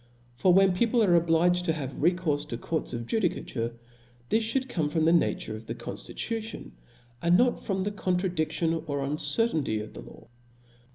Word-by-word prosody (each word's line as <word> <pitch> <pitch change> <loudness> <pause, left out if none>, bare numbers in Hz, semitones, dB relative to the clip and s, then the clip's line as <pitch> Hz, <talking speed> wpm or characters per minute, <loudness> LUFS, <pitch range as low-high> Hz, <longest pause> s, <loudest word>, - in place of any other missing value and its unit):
For 180 +9 +3
when 190 +1 +5
people 230 +5 +2
are 185 -4 +4
obliged 170 +1 +3
to 165 - +2
have 140 -4 -4
recourfe 160 -3 +1
to - - -3
courts 160 -1 -3
of 115 0 -4
judicature, 120 - -1 0.5
this 225 +1 +2
fliould 260 +4 -1
come 160 - -1
from 160 0 +1
the 165 - +5
nature 165 -9 +1
of 110 +1 -10
the 115 - -4
conftitution, 220 - -6 0.5
and 170 +1 +4
not 245 +2 +3
from 195 -2 -2
the 205 +2 -1
contradic 180 -5 -1
tion 165 -1 -1
or 140 -1 -2
uncertainty 145 - +1
of 105 0 -7
the 60 - -8
law. - - -14
170 Hz, 175 wpm, -28 LUFS, 145-190 Hz, 0.5 s, when